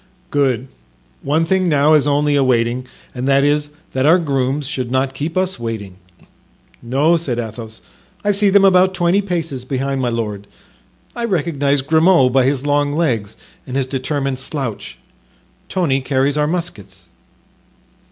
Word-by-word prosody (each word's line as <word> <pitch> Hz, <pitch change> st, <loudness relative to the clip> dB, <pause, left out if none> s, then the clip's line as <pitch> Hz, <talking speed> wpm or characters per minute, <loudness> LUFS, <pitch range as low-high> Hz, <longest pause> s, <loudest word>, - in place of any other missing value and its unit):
"Good! 135 Hz, -3 st, +1 dB, 0.5 s
one 155 Hz, +4 st, +1 dB
thing 185 Hz, +1 st, +1 dB
now 150 Hz, 0 st, +4 dB
is 150 Hz, -2 st, +4 dB
only 145 Hz, 0 st, +2 dB
awanting 125 Hz, -2 st, +1 dB, 0.3 s
and 125 Hz, +1 st, -4 dB
that 140 Hz, 0 st, +4 dB
is, 145 Hz, 0 st, +1 dB, 0.2 s
that 130 Hz, -, 0 dB
our 160 Hz, +5 st, +6 dB
grooms 140 Hz, -3 st, -1 dB
should 130 Hz, -4 st, -3 dB
not 130 Hz, +1 st, 0 dB
keep 155 Hz, +6 st, -4 dB
us 185 Hz, -6 st, 0 dB
waiting." 110 Hz, -5 st, -5 dB, 0.8 s
"No," 140 Hz, +8 st, +2 dB
said 140 Hz, -8 st, -3 dB
Athos. 110 Hz, -1 st, -7 dB, 0.4 s
"I 205 Hz, -, +2 dB
see 205 Hz, 0 st, +2 dB
them 195 Hz, 0 st, +5 dB
about 185 Hz, 0 st, +4 dB
twenty 175 Hz, +2 st, +2 dB
paces 165 Hz, -9 st, -3 dB
behind 135 Hz, +1 st, -2 dB
my 125 Hz, -, 0 dB
lord. 105 Hz, -4 st, -4 dB, 0.7 s
I 235 Hz, -, -4 dB
recognize 145 Hz, -8 st, 0 dB
Grimaud 160 Hz, -3 st, +4 dB
by 135 Hz, -1 st, +4 dB
his 135 Hz, 0 st, 0 dB
long 145 Hz, 0 st, +1 dB
legs 120 Hz, -11 st, -1 dB, 0.3 s
and 130 Hz, +1 st, -3 dB
his 135 Hz, -, +1 dB
determined 135 Hz, 0 st, -2 dB
slouch. 135 Hz, -5 st, -5 dB, 0.7 s
Tony 145 Hz, -8 st, 0 dB
carries 135 Hz, +1 st, 0 dB
our 150 Hz, 0 st, +1 dB
muskets." 170 Hz, -, -5 dB
140 Hz, 150 wpm, -18 LUFS, 130-160 Hz, 0.8 s, our